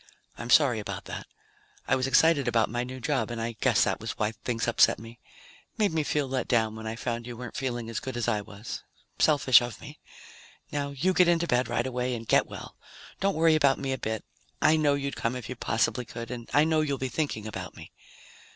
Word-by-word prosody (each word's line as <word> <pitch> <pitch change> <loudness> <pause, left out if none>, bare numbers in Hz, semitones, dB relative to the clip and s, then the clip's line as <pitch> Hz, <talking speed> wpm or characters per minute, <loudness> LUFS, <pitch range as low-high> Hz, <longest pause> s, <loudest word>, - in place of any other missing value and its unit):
"I'm - - -7
sorry - - +5
about - - -6
that. - - -7 0.6
I - - +3
was 130 0 0
excited 140 0 +4
about 115 -3 +2
my 120 +1 -1
new 130 +1 -7
job 130 -3 -1
and 120 -1 -4
I 115 +1 -2
guess - - +4
that - - 0
was - - -4
why 105 0 0
things 115 0 -3
upset 120 - +4
me. 115 +1 -12 0.6
Made 205 -6 +2
me 160 - +1
feel 150 -1 0
let 130 -1 -2
down 110 -2 +1
when 110 0 -7
I 110 - -3
found 120 0 -4
you 120 -1 -7
weren't 125 -1 -8
feeling 120 -3 -3
as 115 -2 -3
good 130 -2 -6
as 120 - -1
I 110 -3 +1
was. 105 +2 -8 0.4
Selfish 135 -6 +6
of 120 -2 -5
me. 145 +1 -11 0.7
Now 140 -1 -2
you 150 +7 0
get 180 -1 +5
into 170 0 +3
bed 125 -5 +1
right 120 - -1
away 125 -1 -1
and 115 -1 -7
get - - +4
well. - - -9 0.4
Don't 195 0 +1
worry 160 0 +4
about 140 -3 +4
me 135 -1 -2
a - - -2
bit. 110 -1 -3 0.3
I 155 - +5
know 150 -2 +3
you'd 140 0 -3
come 115 +2 -1
if 125 -4 -6
you 125 - -4
possibly 120 +1 0
could. 115 +1 -7
And 120 -2 -7
I 145 - +5
know 160 0 +2
you'll 140 -3 -1
be 130 - -2
thinking 130 -6 -2
about 110 - -6
me. - - -11
125 Hz, 230 wpm, -28 LUFS, 115-145 Hz, 0.7 s, Selfish